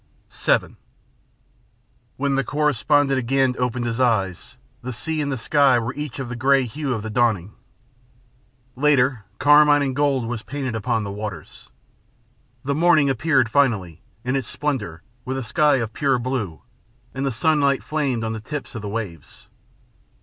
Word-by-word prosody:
VII - - 0 1.4
When 140 0 0
the 135 0 +1
correspondent 145 -1 +2
again 130 +1 +1
opened 125 -1 -1
his 115 0 -3
eyes, 110 -3 0 0.2
the 125 +1 -5
sea 155 +8 -3
and 145 -1 -2
the 135 - -2
sky 135 +1 +3
were 120 +1 -2
each 150 -3 -6
of 135 -2 -4
the 120 - -5
grey 135 +2 +3
hue 135 +4 -4
of 105 - -5
the 110 - -5
dawning. 110 -5 +1 1.2
Later, 130 -5 +2
carmine 145 +1 +5
and 135 -2 -2
gold 140 -4 +1
was 115 -1 -4
painted 135 -1 -4
upon 110 0 -1
the 100 - -5
waters. 105 0 -8 1.0
The 140 - 0
morning 155 -2 +4
appeared 135 -1 +2
finally, 110 - +1 0.2
in 125 +2 -1
its 135 -4 -2
splendor, 115 - -3 0.2
with 130 +1 -3
a 135 - -3
sky 150 +6 +3
of 115 -4 -2
pure 135 -1 +1
blue, 120 -9 -4 0.5
and 135 - -3
the 135 - 0
sunlight 140 +2 +2
flamed 140 -7 -1
on 110 0 -2
the 110 - -5
tips 150 +5 -6
of 115 - -6
the 105 - -5
waves. 100 -8 -7
130 Hz, 160 wpm, -22 LUFS, 115-145 Hz, 1.4 s, carmine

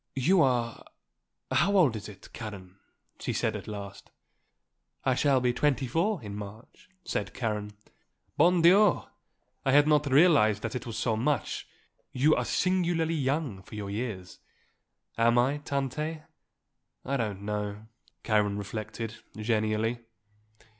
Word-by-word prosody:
"You 170 +8 +3
are 120 -4 +1 0.7
how 200 0 +3
old 145 -11 +4
is 105 0 -6
it, 95 -3 -14
Karen?" 100 -4 -8 0.4
she - - -3
said - - 0
at - - -7
last. 100 -1 -8 1.0
"I 130 - +3
shall 135 +1 +3
be 125 -1 +1
twenty 135 -1 +1
four 165 - 0
in 100 -1 -6
March," 105 - -10 0.2
said 100 - -3
Karen. 105 -3 -3 0.6
"Bon 170 +3 +4
Dieu! 195 +3 +6 0.6
I 135 - +2
had 145 +2 +6
not 150 -2 +3
realised 135 - +5
that 110 - -3
it 125 - -5
was 115 -2 -5
so 115 -1 0
much; 135 +6 -1 0.5
you 145 +5 +4
are - - -1
singularly 175 -3 +1
young 140 -8 -1
for 95 - -12
your 100 -2 -5
years." 100 -5 -5 0.8
"Am 120 +1 +4
I, 130 +4 +3
Tante? 145 +3 -3 0.8
I 140 +1 0
don't 105 -5 -3
know," 105 0 -4 0.4
Karen 105 -2 +1
reflected, 110 +2 -5 0.2
genially. 110 +1 0
120 Hz, 135 wpm, -28 LUFS, 105-150 Hz, 1.0 s, Dieu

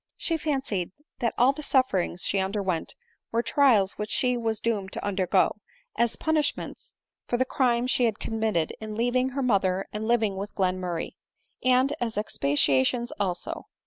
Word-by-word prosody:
She 330 - -1
fancied 265 - -2 0.3
that 235 -2 0
all 255 +3 +5
the 305 - -7
sufferings 200 -11 +1
she 195 - +1
underwent 190 -3 -2 0.4
were 230 +1 +1
trials 230 -7 +3
which 210 0 -3
she 250 +3 +2
was 225 -3 -1
doomed 205 -5 -1
to - - -4
undergo, 190 -2 +2 0.4
as 235 -1 +2
punish 315 -2 +1
ments - - -8 0.3
for 240 - 0
the 260 - +2
crime 245 -2 +1
she 255 -1 +2
had 220 -2 0
committedjn 215 -1 -2
leaving 250 +2 +1
her 270 +1 -3
mother 195 -5 +1
and 215 +1 -3
living 220 -5 +2
with 200 +2 -6
Glenmurray; 185 -3 -1 0.5
and 255 +2 +3
as 230 -2 -2
expiations 145 - +1
also. 180 -3 -2
220 Hz, 155 wpm, -26 LUFS, 190-250 Hz, 0.5 s, all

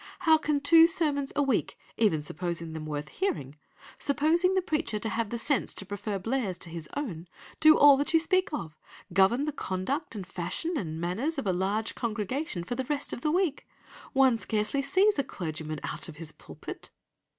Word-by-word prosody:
How 320 -3 +5
can 300 -1 0
two 325 +3 +8
sermons 290 -5 +1
a 290 - +3
week, 270 -5 0 0.2
even 165 -10 +2
supposing 170 +1 -4
them 155 -1 -6
worth 150 0 -4
hearing, 240 - -3 0.4
supposing 325 +7 +2
the 375 - +3
preacher 300 -10 -1
to 220 +1 -3
have 225 -1 -1
the 235 - -3
sense 260 +1 0
to 200 - -5
prefer 205 +1 -4
Blair's 215 -2 -2
to 170 - -6
his 165 -2 -6
own, 180 - -4 0.3
do 310 0 +7
all 285 -1 +8
that 285 - -1
you 325 - +5
speak 370 +3 +1
of, 160 - -5 0.3
govern 195 +9 +4
the 305 - -1
conduct 265 - -3
and 195 -3 -5
fashion 185 - -3
and 160 - -3
manners 220 - -2
of 275 - -3
a 190 - +1
large 200 +5 -1
congregation 225 - -3
for 180 - -4
the 260 +1 -3
rest 290 +1 -2
of - - -5
the 305 - 0
week? 335 -3 0 0.5
One 265 -4 +4
scarcely 215 +6 -1
sees 385 +4 +3
a - - +3
clergyman 155 - -5
out - - -4
of 160 - -9
his 160 0 -7
pulpit! - - -10
235 Hz, 195 wpm, -28 LUFS, 180-295 Hz, 0.5 s, two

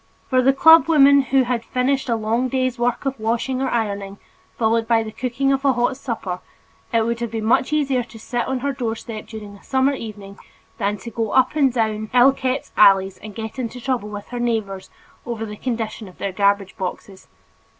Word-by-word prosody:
For 255 0 +4
the 265 +2 +5
club 320 +4 +7
woman 280 -3 +6
who 265 0 +2
had 240 -2 -2
finished 260 +2 -1
a 230 - +2
long 225 +3 0
day's 255 -1 -1
work 245 +3 0
of 270 -3 -2
washing 235 +4 -1
or 265 - 0
ironing 200 -4 -2 0.4
followed 225 0 +1
by 225 -1 +3
the 215 - -7
cooking 260 +4 -1
of 270 0 -1
a 275 -2 +4
hot 245 +2 0
supper, 225 -9 -4 0.5
it 230 -1 +2
would 235 0 -2
have 235 -1 -3
been 220 -1 -4
much 245 +5 +2
easier 275 -4 +1
to 235 - -14
sit 240 +2 -3
on 260 -1 -2
her 280 +1 -1
doorstep 225 -3 -5
during 210 -2 -9
a - - -22
summer 265 +1 +1
evening 205 -5 -8 0.4
than 205 0 0
to 230 +4 -9
go 225 -1 -2
up 260 +3 +3
and 275 -4 +3
down 220 -2 -1
ill 250 +2 +7
kept 260 0 -3
alleys 195 -2 +5
and 215 -1 -10
get 220 +3 -6
into 250 0 -4
trouble 245 -4 -2
with 205 -1 -8
her 245 - -5
neighbors 215 -5 -2 0.3
over 230 -2 -4
the 210 -1 -7
condition 225 -2 -4
of 185 - -15
their 200 - -3
garbage 200 0 +1
boxes. 190 +1 -6
235 Hz, 205 wpm, -21 LUFS, 215-260 Hz, 0.5 s, club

